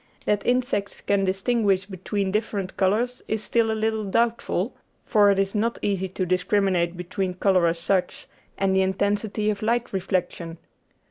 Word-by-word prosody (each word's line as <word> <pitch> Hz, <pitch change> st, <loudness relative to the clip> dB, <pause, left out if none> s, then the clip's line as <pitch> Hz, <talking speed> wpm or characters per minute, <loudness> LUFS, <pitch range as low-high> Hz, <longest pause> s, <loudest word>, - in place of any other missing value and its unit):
That 205 Hz, -1 st, +1 dB
insects 245 Hz, -5 st, 0 dB
can 200 Hz, -1 st, +1 dB
distinguish 195 Hz, 0 st, +1 dB
between 195 Hz, 0 st, -3 dB
different 200 Hz, -2 st, -2 dB
colours 225 Hz, +6 st, +1 dB
is 220 Hz, -1 st, -2 dB
still 230 Hz, -1 st, +1 dB
a -, -, +1 dB
little 220 Hz, 0 st, 0 dB
doubtful, 230 Hz, +4 st, 0 dB, 0.3 s
for 205 Hz, -2 st, +4 dB
it 200 Hz, -, +3 dB
is 195 Hz, 0 st, 0 dB
not 230 Hz, +2 st, 0 dB
easy 190 Hz, -2 st, 0 dB
to 185 Hz, +1 st, -2 dB
discriminate 180 Hz, -1 st, +1 dB
between 180 Hz, +1 st, -3 dB
colour 185 Hz, -2 st, +3 dB
as 165 Hz, +1 st, 0 dB
such 180 Hz, +2 st, -1 dB, 0.3 s
and 195 Hz, -1 st, +1 dB
the 190 Hz, -, +4 dB
intensity 205 Hz, +2 st, 0 dB
of 205 Hz, -, -5 dB
light 235 Hz, +1 st, 0 dB
reflection. 175 Hz, -3 st, -2 dB
200 Hz, 155 wpm, -24 LUFS, 185-215 Hz, 0.3 s, for